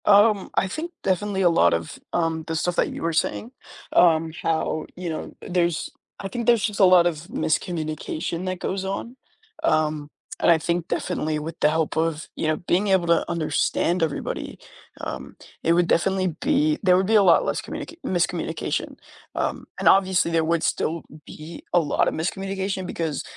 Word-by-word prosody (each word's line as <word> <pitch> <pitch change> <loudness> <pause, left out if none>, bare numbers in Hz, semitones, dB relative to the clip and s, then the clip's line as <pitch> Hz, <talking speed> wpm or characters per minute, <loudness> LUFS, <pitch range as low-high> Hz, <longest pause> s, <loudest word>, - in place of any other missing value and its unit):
Um, 205 -1 +5
I 190 - +2
think, 320 - -5
definitely, 195 +1 0
a 180 - +5
lot 85 - +4
of, 85 -1 -3
um, 165 -2 0
the 165 - -2
stuff 175 +2 0
that - - +2
you - - -7
were 165 0 0
saying, 220 +8 -1 0.4
um, 165 -2 +4
how, 160 -1 -1
you 180 -1 -5
know 160 - -5
uh, - - -8
there's 175 -2 0 0.3
I 195 - -4
think 235 +3 -4
there's 235 -3 +4
just 210 -2 -1
a 195 - +7
lot 180 -1 +6
of 170 -3 -1
miscommunication 160 +1 -2
that 185 -1 -3
goes 190 +1 -3
on, 200 +5 -4 0.5
um, 155 - +1 0.3
and - - +3
I 165 - +6
think, 170 +1 -2
definitely, 155 0 -2
with 155 +2 -6
the 150 - +4
help 160 0 0
of, 160 -1 -1
you 160 - -2
know, 155 0 +1
being 180 +3 0
able 190 -3 +3
to 170 0 +2
understand 170 +2 0
everybody, 160 -3 -3 0.4
um, - - -6 0.3
it 165 - +3
would 175 0 +3
definitely, 185 -1 +1
be 300 +2 +2
there 180 -2 +5
would 190 - +2
be 220 +3 +2
a 205 - +7
lot 175 -3 +5
less - - -1
communica - - -7
miscommunication, 175 -2 -2 0.4
um, - - -2
and - - 0
obviously, 190 -3 +4
there 165 -1 +2
would 165 0 +1
still 165 0 -1 0.2
be 155 +2 -10
a 175 - +6
lot 150 -4 +1
of - - -1
miscommunication, 190 +2 -3
because 160 -5 -3
175 Hz, 185 wpm, -24 LUFS, 160-190 Hz, 0.5 s, a